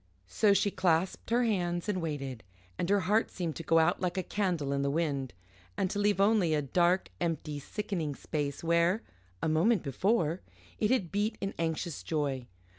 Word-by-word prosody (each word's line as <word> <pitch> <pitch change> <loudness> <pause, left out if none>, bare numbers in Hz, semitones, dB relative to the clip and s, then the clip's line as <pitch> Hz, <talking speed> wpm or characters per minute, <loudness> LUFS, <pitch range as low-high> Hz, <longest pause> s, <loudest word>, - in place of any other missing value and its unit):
So 200 - +3
she 200 +1 +2
clasped 175 0 0
her 240 +2 +3
hands 175 -6 0
and 195 -4 -1
waited, 135 -7 -4 0.3
and 175 - -2
her 200 0 +4
heart 210 +5 +2
seemed 170 -4 -4
to - - -4
go 165 +1 +3
out 160 -1 +3
like 180 0 -1
a 185 - 0
candle 175 -9 -1
in 140 - 0
the 140 - +1
wind, 140 -4 -1 0.5
and 185 - 0
to 205 - -2
leave 205 -1 +2
only 200 -6 +4
a 150 - +1
dark, 175 +6 +2
empty, 155 -3 -2
sickening 175 -4 -3
space 145 -1 -3
where, 170 +5 +2 0.4
a - - +2
moment 170 +6 +3
before, 170 - +1 0.4
it 210 - +2
had 220 -10 +1
beat 210 +2 0
in 195 0 -3
anxious 165 -1 -2
joy. 140 -5 -2
170 Hz, 185 wpm, -30 LUFS, 155-200 Hz, 0.5 s, her